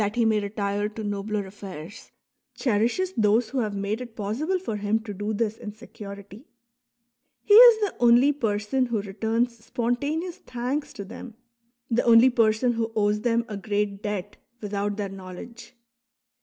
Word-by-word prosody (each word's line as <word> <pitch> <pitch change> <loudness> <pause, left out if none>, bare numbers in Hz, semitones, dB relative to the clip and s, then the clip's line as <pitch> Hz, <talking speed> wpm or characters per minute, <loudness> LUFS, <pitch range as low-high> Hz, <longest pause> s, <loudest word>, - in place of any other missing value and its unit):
he 235 -1 +2
may 220 -1 +3
retire 205 0 -2
to 220 +1 -7
nobler 205 0 -2
affairs,'' 190 -1 -10 0.4
cherishes 245 - 0
those 220 +1 +2
who 265 - -2
have 215 -4 -2
made 200 +4 -2
it 240 -3 -9
possible 245 - -1
for 290 - -4
him 205 +1 +1
to 220 -2 -7
do 205 +2 -3
this 220 0 -1
in 210 - -7
security; 205 -1 -11 1.0
he 410 - +3
is 460 0 +9
the 415 - -1
only 245 +4 +5
person 230 0 0
who 235 -3 -1
returns 225 +3 -2
spontaneous 290 +9 -2
thanks 255 +5 -4
to 200 - -8
them, 225 +3 -10 0.6
the 235 +2 +3
only 235 +2 +6
person 230 +1 +2
who 225 -1 -2
owes 210 0 +1
them 235 0 +1
a 215 - -6
great 205 0 -2
debt 205 -1 -4 0.2
without 205 -1 -3
their 205 -1 -2
knowledge. 195 +7 -10
220 Hz, 155 wpm, -25 LUFS, 205-240 Hz, 1.0 s, is